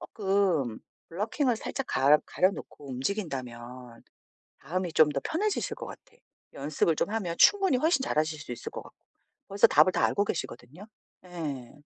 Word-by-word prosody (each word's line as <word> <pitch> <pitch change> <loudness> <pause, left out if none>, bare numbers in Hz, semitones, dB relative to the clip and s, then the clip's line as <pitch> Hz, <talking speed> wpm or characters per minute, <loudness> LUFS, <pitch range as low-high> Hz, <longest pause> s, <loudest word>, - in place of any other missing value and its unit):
쪼끔 190 - 0 0.3
블러킹을 225 - 0
살짝 270 +4 -5
가 145 +3 +4
가려놓고 185 -6 -2
움직인다면 125 - -5 0.6
마음이 180 +3 -2
좀 155 -1 +5
더 140 -1 -2
편해지실 405 +6 -1
것 - - -7
같아. - - -10 0.5
연습을 150 +3 0
좀 - - -1
하면 195 -6 -2
충분히 390 -8 +5
훨씬 310 +2 +2
잘하실 155 - -1
수 - - -10
있을 120 - -7
것 - - -6
같고 - - -17 0.5
벌써 200 +1 +5
답을 185 - +5
다 - - +1
알고 205 - +1
계시거든요. 155 - -6 0.4
예. 150 -9 -6
170 Hz, 320 characters per minute, -28 LUFS, 135-205 Hz, 0.6 s, 좀